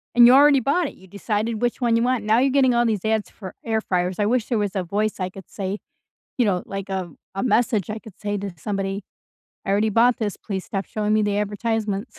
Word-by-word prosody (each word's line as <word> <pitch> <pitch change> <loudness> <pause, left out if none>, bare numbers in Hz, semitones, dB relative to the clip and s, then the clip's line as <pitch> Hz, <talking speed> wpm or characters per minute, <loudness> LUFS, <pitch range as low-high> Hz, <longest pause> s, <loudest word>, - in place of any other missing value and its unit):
and 240 0 +9
you 245 - +7
already 280 0 +7
bought 285 +6 +1
it, - - -9
you 190 - -17
decided 210 +3 -2
which 245 +1 0
one 235 -1 +3
you 230 - +2
want, 250 -3 +1
now 220 +2 +3
you're 270 +2 +3
getting 260 -2 +4
all 240 0 +3
these 220 -2 -1
ads 220 -1 0
for 190 -4 -10
air 220 -1 0
fryers, 180 -1 -1
I 205 - +2
wish 235 +1 +1
there 240 - 0
was 205 -1 -1
a 190 - 0
voice 205 +4 -1
I 185 -1 -2
could 190 0 -13
say, 195 +1 -4 0.6
you 245 - +3
know, 185 -4 0
like 195 0 -6
a 185 -3 -3 0.2
a 195 - -1
message 235 -5 +1
I 215 +1 -4
could 215 -4 -15
say 205 -1 -2
to 200 -2 -5
somebody, 195 +2 -3 0.6
"I - - -1
already 205 +2 +2
bought 235 +3 +4
this, 210 -3 -2
please 190 -3 -5
stop 195 -1 -3
showing 210 0 -1
me 215 - +3
the 205 0 0
advertisements." 210 +1 -2
210 Hz, 245 wpm, -23 LUFS, 195-235 Hz, 0.6 s, and